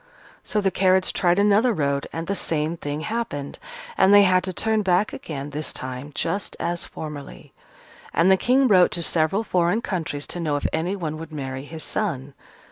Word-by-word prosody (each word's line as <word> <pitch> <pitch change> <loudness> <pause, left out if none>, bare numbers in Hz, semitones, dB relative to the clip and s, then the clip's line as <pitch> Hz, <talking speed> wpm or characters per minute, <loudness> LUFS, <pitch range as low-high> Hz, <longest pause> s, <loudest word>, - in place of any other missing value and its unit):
So 210 - 0
the 195 -1 +1
carriage 185 0 +2
tried 175 -1 +2
another 210 +4 +4
road, 140 -5 -1
and 165 0 -4
the 195 - -1
same 160 -3 -1
thing 145 -2 -4
happened, 215 -10 -4 0.4
and 190 - +6
they 205 0 +8
had 185 -1 +3
to 190 - -2
turn 220 +3 0
back 190 +1 +1
again 145 -2 -6
this 150 +1 -3
time, 130 +2 -6
just 200 0 -2
as 175 0 -2
formerly. 150 -3 -9 0.6
And 170 +4 +4
the - - +7
King 255 +7 +3
wrote 185 -5 +6
to 170 - -2
several 165 +7 +1
foreign 185 +3 +1
countries, 160 -6 -3
to 175 - -5
know 155 -4 0
if 145 - -3
anyone 160 -1 -2
would 165 0 -8
marry 135 -2 -5
his 160 +1 -6
son. 145 -10 -3
170 Hz, 185 wpm, -23 LUFS, 150-200 Hz, 0.6 s, they